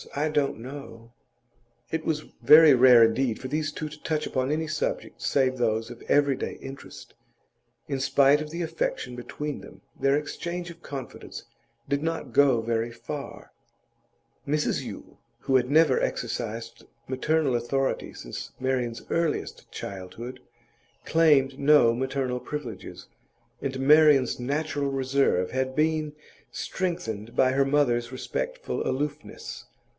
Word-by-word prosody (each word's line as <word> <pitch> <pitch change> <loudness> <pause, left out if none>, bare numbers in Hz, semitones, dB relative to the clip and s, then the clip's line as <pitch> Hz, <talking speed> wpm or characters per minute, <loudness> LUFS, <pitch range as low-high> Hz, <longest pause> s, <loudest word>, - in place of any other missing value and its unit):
I 150 +2 0
don't 145 -2 0
know.' 120 -2 -10 0.8
It 160 0 -1
was 150 -2 0 0.2
very 155 -1 +9
rare 125 -2 +8
indeed 115 +1 +2
for 130 - -6
these 150 +1 -1
two 155 - -5
to 150 0 -11
touch 155 -1 -1
upon 130 0 -1
any 160 +1 0
subject 155 0 -3
save 130 -2 +1
those 115 0 0
of 120 - -11
everyday 140 -2 +2
interest. 135 +1 -10 0.7
In 135 -2 -2
spite 140 +2 +4
of 155 - -5
the 170 +2 -3
affection 160 -6 -3
between 145 +4 -5
them, - - -14 0.2
their 135 0 +3
exchange 175 +3 -4
of 170 - -15
confidence 135 -5 -8 0.4
did 140 0 0
not 165 +1 -3
go 135 -5 +5
very 115 0 -1
far; 140 +4 -8 1.0
Mrs 150 +1 0
Yule, - - -9 0.2
who 135 - +1
had 125 -1 +3
never 155 -2 +5
exercised 115 -1 -4 0.2
maternal 140 +2 +1
authority 135 +3 -1
since - - -8
Marian's 125 -3 -1
earliest 165 -2 -1
childhood, 100 +6 -7 0.7
claimed 145 -4 +3
no 140 -5 +5
maternal 130 0 -2
privileges, 125 -8 -7 0.6
and 130 -1 -3
Marian's 145 -2 +5
natural 145 +2 -1
reserve 135 -8 +1
had 130 0 -1
been 155 -1 +1 0.4
strengthened 115 - -4
by 130 - +4
her 135 +1 +2
mother's 125 -4 +1
respectful - - -4
aloofness. 145 +3 -4
135 Hz, 130 wpm, -26 LUFS, 125-150 Hz, 1.0 s, very